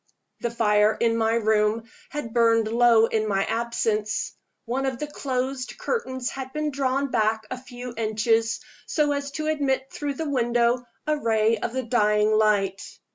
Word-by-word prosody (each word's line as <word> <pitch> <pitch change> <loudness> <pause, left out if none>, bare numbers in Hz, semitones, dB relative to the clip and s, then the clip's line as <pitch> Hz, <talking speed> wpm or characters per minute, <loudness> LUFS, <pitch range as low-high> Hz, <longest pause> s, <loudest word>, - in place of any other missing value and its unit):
The 235 - -1
fire 210 -2 +3
in 230 -1 +2
my 225 0 +2
room 220 0 +2 0.3
had 260 -7 -5
burned 230 -2 +4
low 230 0 +5
in 220 -1 -1
my 195 -1 +1
absence. 220 -2 -1 0.3
One 260 +3 -1
of 260 -2 -2
the 300 - -3
closed 260 -3 -3
curtains 260 - -2
had 265 -1 -6
been 305 -1 -1
drawn 275 0 0
back 220 0 +1
a 255 - -3
few 245 -1 -8
inches, 225 +1 +1 0.3
so 300 -2 +1
as 285 0 -2
to 310 +1 -3
admit 275 -4 0
through 285 -1 -3
the 320 +3 -3
window 240 -2 +1 0.2
a 305 0 +1
ray 225 -2 +2
of 230 - -3
the 260 0 -1
dying 210 -3 +2
light. 205 -3 +2
235 Hz, 165 wpm, -25 LUFS, 220-265 Hz, 0.3 s, low